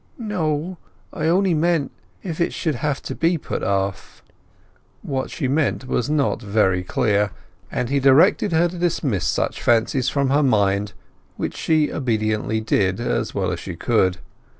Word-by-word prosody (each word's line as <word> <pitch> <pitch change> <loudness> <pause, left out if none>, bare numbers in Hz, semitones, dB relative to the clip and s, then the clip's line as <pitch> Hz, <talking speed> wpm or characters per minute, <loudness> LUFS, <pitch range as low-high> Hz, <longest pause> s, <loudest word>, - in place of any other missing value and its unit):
"No—I 165 - -4
only 185 +2 +3
meant—if 165 +1 -2
it 170 - +1
should 160 - -1
have 140 +2 -2
to - - -5
be 165 +1 +1
put - - -5
off." 95 0 -2 0.8
What 130 -1 -3
she 140 - -3
meant 140 -1 0
was 125 0 -1
not 150 -4 +1
very 100 -4 +1
clear, 105 +2 +1 0.4
and 125 - -1
he 140 +1 +2
directed 145 +9 +4
her 165 +2 +3
to 175 0 -7
dismiss 140 - 0
such - - -1
fancies 120 +2 +2
from 140 -2 0
her 145 +2 +4
mind, 100 -6 +1 0.4
which - - -3
she 155 -2 +1
obediently 110 -3 -1
did 95 -2 +1
as 120 - -2
well - - 0
as - - -3
she - - -6
could. 95 -1 +1
135 Hz, 150 wpm, -22 LUFS, 110-160 Hz, 0.8 s, directed